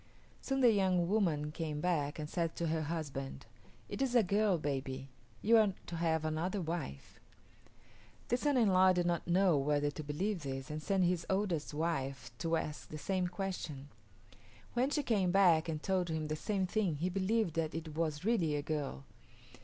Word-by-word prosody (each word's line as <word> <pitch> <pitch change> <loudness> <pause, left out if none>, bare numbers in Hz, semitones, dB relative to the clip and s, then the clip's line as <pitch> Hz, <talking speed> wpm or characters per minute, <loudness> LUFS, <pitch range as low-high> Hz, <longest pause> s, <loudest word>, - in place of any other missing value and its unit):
Soon 270 0 -1
the 245 -2 +7
young 185 -4 +2
woman 165 -8 +1
came 155 -2 -3
back 150 -4 0
and 150 -1 -4
said 165 0 -2
to 170 -1 -1
her 160 0 0
husband, 145 -4 -4 0.4
"It - - -5
is 260 -2 +1
a 235 - +6
girl 200 0 +2
baby. 135 -2 -3 0.3
You 230 +2 +6
are 210 -3 +4
to 170 - -6
have 160 -1 +1
another 165 +6 -1
wife." 160 - -5 1.1
The 245 - +3
son 285 +1 +1
in 225 -4 +4
law 185 0 +6
did 175 -1 +1
not 170 -1 0
know 175 -3 +4
whether 145 +1 +1
to 155 - -6
believe 175 +6 -2
this, 135 -1 -5
and 155 +1 -4
sent 190 +3 +1
his 175 -1 +1
oldest 185 -7 -1
wife 140 -6 -2
to 165 0 +1
ask 150 -2 -4
the 155 - -6
same 185 +3 -1
question. 175 -7 -5 0.8
When 250 +3 +2
she 290 0 0
came 205 -7 +2
back 175 -4 +4
and 155 -1 -3
told 185 -3 0
him 155 -1 -2
the 155 - 0
same 195 +4 -1
thing 185 -3 0
he 165 +5 -1
believed 195 0 +1
that 160 -1 -1
it 160 -1 -5
was 160 0 -1
really 180 -10 +2
a 145 - -2
girl. 145 - -3
170 Hz, 185 wpm, -34 LUFS, 150-195 Hz, 1.1 s, the